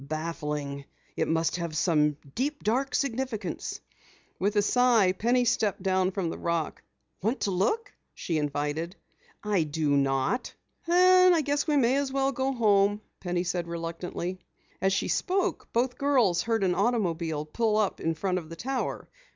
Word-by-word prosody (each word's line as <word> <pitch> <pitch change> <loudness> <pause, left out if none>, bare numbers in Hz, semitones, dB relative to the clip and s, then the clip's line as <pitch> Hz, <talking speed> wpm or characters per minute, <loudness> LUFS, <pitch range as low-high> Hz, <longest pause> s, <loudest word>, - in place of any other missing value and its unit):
"Baffling! 150 -2 -4 0.3
It - - 0
must 165 +1 +1
have 170 -3 -4
some 150 -3 +2 0.2
deep, 290 +4 -2
dark 260 +6 0
significance." 245 - -2 0.6
With 200 +3 0
a 205 - +5
sigh, 235 -4 +4
Penny 240 +6 +1
stepped 210 -5 0
down 185 -1 +2
from 185 -3 -2
the - - -7
rock. 170 -2 -2 0.4
"Want 225 +7 -1
to 200 - 0
look?" 220 - 0 0.2
she 165 -3 -2
invited. 150 +4 -2 0.5
"I 205 -4 +1
do 150 -1 -1
not!" 135 - 0 0.3
"Then 365 +1 +6
I 325 - +3
guess 290 +1 -1
we 300 -1 +2
may 255 0 +3
as 280 -1 -1
well 270 0 +1
go 265 +1 -1
home," 205 -4 +3 0.2
Penny 175 -1 -1
said 175 -1 -2
reluctantly. 170 +2 -4 0.4
As 190 - +2
she 190 - 0
spoke, 375 0 -1
both 245 +2 0
girls 250 -11 +3
heard 225 -3 0
an 180 -2 +2
automobile 170 -8 0
pull 215 +7 0
up 210 -3 0
in 165 0 0
front 185 +2 -1
of 160 -3 -12
the 165 - -7
tower. 260 +8 -3
195 Hz, 160 wpm, -28 LUFS, 165-250 Hz, 0.6 s, Then